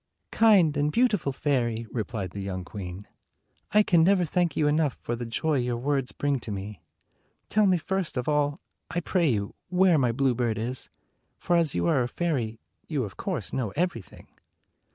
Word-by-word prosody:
"Kind 190 -10 +5
and 145 +1 +1
beautiful 210 - +2
fairy," 120 -5 -1
replied 110 -5 -3
the 100 - -6
young 95 -2 -4
queen, 95 0 -7 0.6
"I 210 +1 +5
can 170 -5 +4
never 185 0 +4
thank 170 -1 0
you 155 - +2
enough 150 -2 +1
for 120 - -3
the 120 0 -5
joy 150 +5 0
your 120 -1 -1
words 135 +1 -1
bring 145 -2 -1
to 115 - -7
me. 100 0 -6 0.7
Tell 215 -1 +3
me 185 -1 +4
first 180 -3 -2
of 125 - -2
all, 145 -1 +1 0.3
I 175 - -1
pray 175 -1 +1
you, 100 -4 -1 0.2
where 180 -3 +4
my 125 -3 +2
bluebird 120 -3 +1
is; 120 +3 -4 0.5
for 175 - 0
as 165 -4 +2
you 85 -1 0
are 125 +9 +3
a 120 - 0
fairy, 125 -8 -2 0.3
you 145 -5 -1
of 100 -4 -7
course 165 - -4
know 125 -5 -1
everything." 165 - -3
140 Hz, 180 wpm, -27 LUFS, 115-170 Hz, 0.7 s, Kind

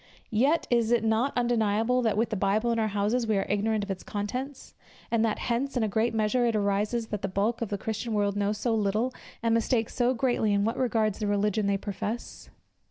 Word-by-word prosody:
Yet, 275 +9 +2
is 235 -2 +3
it 240 -1 +3
not 225 +5 +2
undeniable 235 0 +2
that 220 -4 +1
with 225 +1 +1
the - - 0
Bible 210 +4 +1
in 230 - 0
our 220 - +1
houses, 210 +4 0
we 215 -2 +2
are 195 - 0
ignorant 210 +1 0
of 200 - -4
its 190 - -4
contents; 250 +7 -5 0.4
and 230 -1 +2
that 220 -2 +1
hence, 255 +3 -1
in 240 - +1
a - - +1
great 225 +3 0
measure, 225 +3 +2
it 230 - 0
arises, 210 +3 0
that 210 -2 -3
the - - -1
bulk 205 +5 -1
of 230 - -2
the 205 - -2
Christian 220 +2 -3
world 205 -1 +1
know 205 0 +1
so 220 +2 -1
little, 215 +4 0 0.3
and 230 -1 +2
mistake 230 0 +1
so 250 +1 +1
greatly, 235 -4 +1
in 200 0 +2
what 225 - 0
regards 220 -5 +1
the 210 - -1
religion 205 0 +1
which 200 - +2
they - - +1
profess? 210 +3 -5
220 Hz, 230 wpm, -27 LUFS, 205-235 Hz, 0.4 s, is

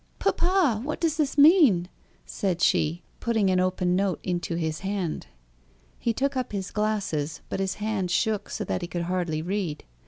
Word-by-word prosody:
"Papa! 345 - +2
what 300 +3 -3
does 320 -2 0
this 295 -2 0
mean?" 285 - +6 0.4
said 185 -4 -2
she, 170 0 +2 0.2
putting 220 -5 +1
an 185 - +2
open 180 -1 +1
note 195 -1 0
into 175 -1 -2
his 160 -2 -2
hand. 195 -4 -3 0.7
He 235 - +1
took 275 +4 -1
up 255 -3 -2
his 195 -1 -3
glasses, 195 -9 -1
but - - -3
his 190 -1 -1
hand 210 -3 -2
shook 210 +2 0
so - - -3
that - - -2
he 175 - -4
could 175 -1 -3
hardly 170 -3 -1
read. 185 -4 -3
195 Hz, 175 wpm, -26 LUFS, 175-225 Hz, 0.7 s, mean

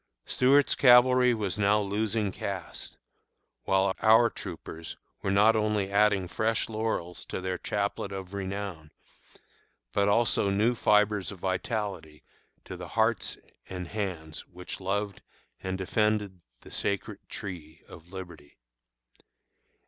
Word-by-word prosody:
Stuart's 140 +2 +4
cavalry 125 0 +6
was 105 -2 -2
now 105 +1 +4
losing 105 +1 -1
caste, - - -6 0.7
while 95 0 +2
our 115 +1 +6
troopers 80 0 -8 0.2
were - - -2
not 105 +3 +5
only 105 -2 0
adding 100 -2 +3
fresh 110 +4 0
laurels 110 -6 -3
to - - -5
their 95 -1 -3
chaplet 100 -1 -2
of 95 -1 -7
renown, 95 -5 -5 1.0
but 100 0 +2
also 105 -2 +3
new 105 +5 +2
fibres 105 -3 +2
of 100 - -9
vitality 95 -4 -3 0.4
to 95 - -7
the 90 -1 -8
hearts 110 +2 0 0.3
and 90 -2 -6
hands 90 -7 -5
which 90 +1 -8
loved 100 +1 -2 0.4
and 95 0 -3
defended 105 -1 0 0.2
the - - -14
sacred 100 -1 -2
Tree 80 -5 -8
of 85 +2 -14
Liberty. 85 -6 -10
100 Hz, 120 wpm, -28 LUFS, 95-110 Hz, 1.0 s, cavalry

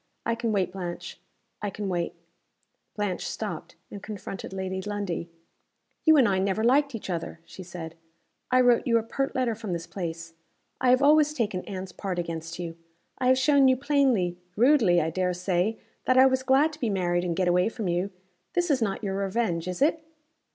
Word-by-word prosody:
I 230 - +1
can 230 -1 -1
wait, 195 -3 0
Blanche 180 -2 -6 0.4
I 205 - -1
can 205 +1 -5
wait!" 175 -2 -2 0.8
Blanche 205 -4 -2
stopped, - - -5 0.2
and 200 - -8
confronted 205 -3 -7
Lady 190 0 -3
Lundie. 200 -4 -3 0.8
"You 315 -1 +7
and 260 -5 +6
I 190 -2 +1
never 195 +3 0
liked 275 +2 +3
each 225 - -6
other," 170 -2 -4
she 190 - -11
said. 170 -2 -8 0.6
"I 255 0 +5
wrote 245 -2 +4
you 230 -1 +4
a 225 - 0
pert 270 +4 -2
letter 255 -3 +1
from 215 -4 -5
this 170 0 -4
place. 165 -3 -6 0.5
I 255 - +3
have 255 +2 +4
always 300 +1 +5
taken 205 -8 -1
Anne's 190 -2 -6
part 185 -1 -4
against 165 -1 -4
you. 170 -1 -6 0.4
I 255 - +1
have 260 0 +5
shown 275 0 +5
you 260 0 +4
plainly 260 -11 +1 0.2
rudely, 230 -7 +5
I 160 0 0
dare 180 +1 0
say 180 +4 0 0.3
that 255 - +3
I 260 - +8
was 260 0 +3
glad 270 +4 +3
to 305 - -11
be 235 - 0
married 175 -3 0
and 175 -2 -1
get 185 0 +1
away 180 +3 +3
from 225 -3 -4
you. 175 +3 0 0.4
This 350 -2 +1
is 265 -3 +2
not 205 -1 -1
your 195 -2 -2
revenge, 195 -4 -1
is 180 +8 0
it?" 315 +1 +1
200 Hz, 195 wpm, -27 LUFS, 180-255 Hz, 0.8 s, I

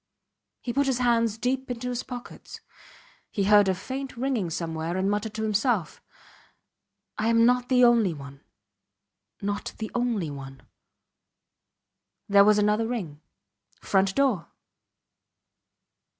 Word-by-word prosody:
He 240 - -4
put 280 +2 +1
his 265 -3 +1
hands 230 -3 +2
deep 255 +3 -2
into 245 0 -4
his 245 0 -2
pockets. 245 -1 -9 0.7
He 200 - -1
heard 205 0 +5
a 190 - +1
faint 260 +7 -6
ringing 245 -8 -1
somewhere, 165 +1 -3
and 190 +2 +1
muttered 210 +1 -2
to 220 - -3
himself: 215 - 0 1.2
I 215 - 0
am 230 0 +4
not 250 +1 +2
the 250 -1 +4
only 235 -6 +5
one... 140 -2 -10 1.0
not 205 0 -3
the 220 - -5
only 235 -10 -1
one. 135 -1 -10 1.6
There 200 0 +6
was 210 +1 +5
another 210 +2 +2
ring. 175 -12 -5 0.6
Front 195 -1 +1
door! 260 -11 +1
220 Hz, 125 wpm, -26 LUFS, 190-245 Hz, 1.6 s, There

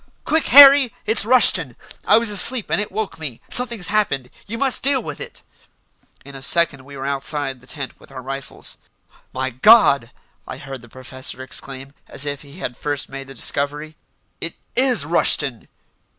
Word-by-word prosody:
"Quick, 320 +1 +1
Harry! 275 -2 +8
It's 220 -1 +3
Rushton. 185 - +5 0.3
I - - +5
was 230 -2 -1
asleep 210 +4 +1
and - - +1
it 210 - -6
woke 210 -3 -5
me. 140 -7 -6
Something's 235 -6 +1
happened. 200 -12 -2 0.2
You 230 +3 -5
must 270 0 +1
deal 275 0 +3
with - - -8
it!" 485 - -6 0.8
In 140 - -12
a 135 - -10
second 140 -2 +1
we 140 0 -12
were 135 - -7
outside 140 -1 0
the 125 - -19
tent 140 -4 -4
with - - -19
our 130 -1 -10
rifles. 135 +1 -6 0.5
"My 130 0 -4
God!" 140 - +4 0.4
I - - -8
heard 135 -2 -9
the 120 - -17
professor 130 +1 -7
exclaim, 135 0 -6
as 140 - -3
if 145 -1 -4
he 145 +2 -15
had 125 -9 -6
first 145 -1 -3
made 135 0 -9
the 135 - -12
discovery. 145 +5 -1 0.4
"It 165 - -5 0.2
is 250 - +2
Rushton!" 140 -7 0
145 Hz, 175 wpm, -19 LUFS, 135-215 Hz, 0.8 s, Harry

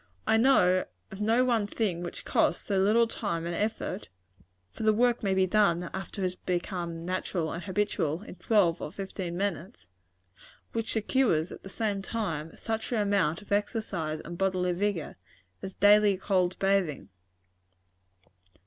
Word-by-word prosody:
I - - +3
know 185 -7 +4 0.3
of 195 - -7
no 230 +4 +3
one 230 -5 +1
thing 200 -5 -1
which 175 - -7
costs - - +1
so 195 -2 +1
little 215 +5 +4
time 200 -7 -3
and 170 - -3
effort 205 - -3 0.6
(for - - -10
the 215 0 +4
work 240 +2 +2
may 195 -2 +1
be 190 0 +4
done 180 -3 +2
after 195 +2 -5
it - - 0
has 180 0 -2
become 175 -2 -3
natural 180 -2 -2
and 170 - -5
habitual, 190 -4 -1
in - - -9
twelve 180 -3 +2
or 150 - -5
fifteen 190 -2 -5
minutes) 190 - -3 0.9
which 225 -1 -2
secures, 215 -7 +1
at - - -9
the 195 - -10
same 205 -1 -2
time, 165 -8 -4
such 225 +1 -3
an 240 - +1
amount 200 -4 +1
of 205 - -21
exercise 200 -7 -1
and 170 +2 -7
bodily 185 -2 +1
vigor, 195 -3 -2 0.4
as 190 - -7
daily 205 0 +5
cold 185 -2 +1
bathing. 185 - 0
195 Hz, 160 wpm, -29 LUFS, 175-210 Hz, 0.9 s, daily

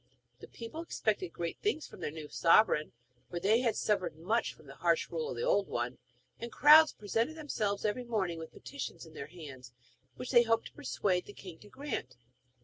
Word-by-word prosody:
The - - -11
people 235 +8 -7
expected 210 - -1
great 170 0 -4
things 365 -7 -1
from - - -13
their - - -2
new 155 0 -8
sovereign, 165 -1 +4 0.4
for 175 - -3
they 210 +6 +4
had 240 -3 +1
suffered 195 -7 0
much 215 +9 0
from - - -18
the - - -11
harsh 465 - +1
rule 470 -1 -2
of - - -4
the - - -3
old - - +2
one, - - -3 0.4
and 235 0 -6
crowds 305 +2 +8
presented 225 +8 -1
themselves 220 -10 -2
every 215 +4 0
morning 190 -8 -1
with 160 - -8
petitions 280 -9 -7
in 160 - -15
their 140 - -7
hands, 135 -7 -11 0.4
which 250 - -6
they 240 -2 +8
hoped 225 -1 +1
to - - -10
persuade 195 -10 -1
the 205 - -10
king 180 -5 -11
to 205 - -15
grant. 255 - -5
215 Hz, 200 wpm, -32 LUFS, 170-260 Hz, 0.4 s, crowds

